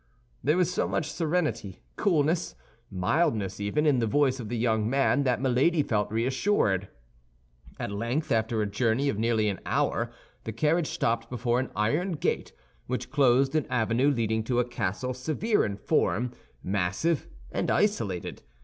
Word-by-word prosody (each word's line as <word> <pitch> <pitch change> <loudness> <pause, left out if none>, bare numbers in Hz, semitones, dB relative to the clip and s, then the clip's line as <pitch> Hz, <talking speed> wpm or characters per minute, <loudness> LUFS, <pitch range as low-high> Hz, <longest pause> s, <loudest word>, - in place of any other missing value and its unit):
There 150 +4 +2
was 180 -1 +2
so - - 0
much 155 - -2
serenity, 155 - -2
coolness, 165 -3 +1 0.3
mildness 100 - 0
even, 105 +10 0
in 145 -4 +4
the 115 - +1
voice 135 +2 +2
of 110 -4 -6
the 120 - -2
young 110 -2 +1
man, 140 +2 +2
that 125 -1 +1
Milady 135 +5 +2
felt 105 -5 -1
reassured. 115 - +1 0.9
At - - -3
length 115 +9 -2
after 110 -1 +1
a - - 0
journey 115 +6 +1
of 105 - -2
nearly 110 -1 +2
an 100 -2 -2
hour, - - 0 0.3
the 110 - -5
carriage 155 +7 +1
stopped 115 0 -1
before 120 0 0
an 130 - -2
iron 150 - 0
gate, 155 - -1 0.4
which 125 0 -3
closed 135 -1 +3
an 155 -3 0
avenue 120 +3 +2
leading 110 -4 0
to 120 0 +1
a 125 - +2
castle 120 +1 -3
severe 155 - 0
in 100 -1 -3
form, 120 +3 +1 0.3
massive, 100 - 0 0.2
and - - -1
isolated. 110 - 0
125 Hz, 160 wpm, -27 LUFS, 110-150 Hz, 0.9 s, in